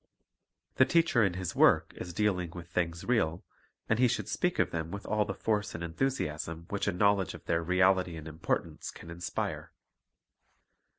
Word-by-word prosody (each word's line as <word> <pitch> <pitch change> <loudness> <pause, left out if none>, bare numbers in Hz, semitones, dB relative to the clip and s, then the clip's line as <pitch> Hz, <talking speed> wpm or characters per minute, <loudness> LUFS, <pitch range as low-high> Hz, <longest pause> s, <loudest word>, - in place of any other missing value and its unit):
The 130 - +7
teacher 165 -8 +3
in 95 -3 +1
his 90 -1 -4
work - - +4
is 90 - -6
dealing 90 -2 0
with 85 -1 -8
things 85 -1 -2
real, 90 -9 +1 0.4
and 110 - +1
he 125 - +6
should - - -1
speak - - 0
of - - +2
them 80 -1 -3
with 100 +3 -6
all 105 0 +1
the 95 - -4
force 105 0 -1
and 85 - -5
enthusiasm 80 - -2
which 100 0 -1
a - - +3
knowledge 100 +1 +2
of - - -13
their 85 0 +1
reality 90 0 +3
and 80 0 -8
importance 80 0 -3
can 85 - -10
inspire. 85 +1 -4
90 Hz, 175 wpm, -30 LUFS, 85-105 Hz, 0.4 s, The